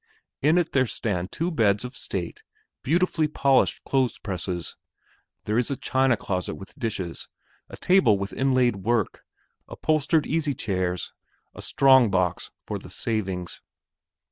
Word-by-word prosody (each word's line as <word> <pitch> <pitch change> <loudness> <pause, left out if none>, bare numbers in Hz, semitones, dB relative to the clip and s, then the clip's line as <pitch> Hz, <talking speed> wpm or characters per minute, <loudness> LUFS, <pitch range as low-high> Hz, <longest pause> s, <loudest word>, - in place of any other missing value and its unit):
In 155 +5 +4
it 175 -2 +1
there 130 -2 +2
stand 90 -5 -2
two 170 +3 -2
beds 105 - +2
of 125 +1 -8
state, 90 -7 -5 0.4
beautifully 165 +1 +1
polished 140 -3 +2
clothes 130 -3 0
presses; 90 -3 -3 0.7
there 105 +3 +1
is 125 - 0
a 140 - -1
china 130 -2 +1
closet 95 -2 -3
with 95 - -11
dishes, 95 -7 -4 0.4
a - - -10
table 180 - +4
with 100 0 -4
inlaid 130 -4 +2
work, 110 +2 -1 0.4
upholstered 155 0 +1
easy 155 -3 0
chairs, 90 -3 -2 0.4
a - - -10
strong 130 -4 +5
box 90 -3 0
for - - -4
the - - -12
savings. 95 -6 -3
120 Hz, 140 wpm, -25 LUFS, 95-140 Hz, 0.7 s, strong